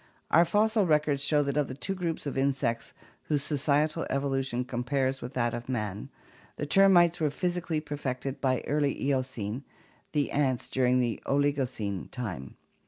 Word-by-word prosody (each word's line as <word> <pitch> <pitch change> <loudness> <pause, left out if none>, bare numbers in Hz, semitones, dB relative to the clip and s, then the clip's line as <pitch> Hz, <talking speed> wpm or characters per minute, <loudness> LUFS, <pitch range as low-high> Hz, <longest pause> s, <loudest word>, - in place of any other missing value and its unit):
Our 170 +2 +6
fossil 210 +2 +2
records 150 -3 +2
show 150 0 +3
that 140 0 -2
of 145 -2 +2
the 130 - -6
two 195 +7 -3
groups 170 -5 -3
of 140 - -3
insects 135 -4 0 0.3
whose 145 -2 0
societal 150 +2 +1
evolution 135 -2 -1
compares 130 +2 -1
with 125 +3 -7
that 120 -2 +1
of 120 +1 -6
man, 105 -5 -3 0.5
the 145 - -3
termites 175 0 +5
were 155 -2 +2
physically 175 0 -1
perfected 140 -2 -4
by 130 -2 +1
early 145 -1 0
Eocene, 130 -3 -2 0.5
the 145 -2 +1
ants 135 -4 0
during 125 -1 +3 0.2
Oligocene 130 -9 0
time. 95 - -6
140 Hz, 150 wpm, -29 LUFS, 125-150 Hz, 0.5 s, Our